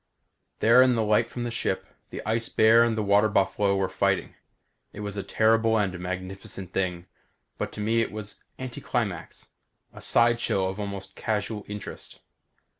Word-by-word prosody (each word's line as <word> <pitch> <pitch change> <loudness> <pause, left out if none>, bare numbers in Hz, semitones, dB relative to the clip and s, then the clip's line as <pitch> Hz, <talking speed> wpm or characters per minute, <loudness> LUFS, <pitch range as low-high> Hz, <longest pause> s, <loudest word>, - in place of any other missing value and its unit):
There, 115 +3 +7
in 130 -1 +5
the 115 - +1
light 110 +2 +2
from 120 - -5
the 120 - -3
ship, 95 -4 -2 0.2
the - - -7
ice 115 +1 0
bear 110 +1 +6
and 115 -2 +1
the 110 - 0
water 105 +1 +4
buffalo 100 0 +2
were 95 -1 +1
fighting. 100 -1 0 0.6
It 105 - -8
was 105 -1 -4
a 100 - -2
terrible 110 +2 +3
and 95 -4 -1
magnificent 95 +1 -6
thing 90 -2 -1 0.5
but - - -2
to 105 - -6
me 115 +2 +2
it - - -2
was 105 -1 -7
anticlimax; 120 -7 -4 0.5
a - - -11
sideshow 115 -5 +2
of 95 +2 -6
almost 100 -1 -6
casual 105 -1 -2
interest. 105 -1 -8
105 Hz, 165 wpm, -26 LUFS, 95-115 Hz, 0.6 s, There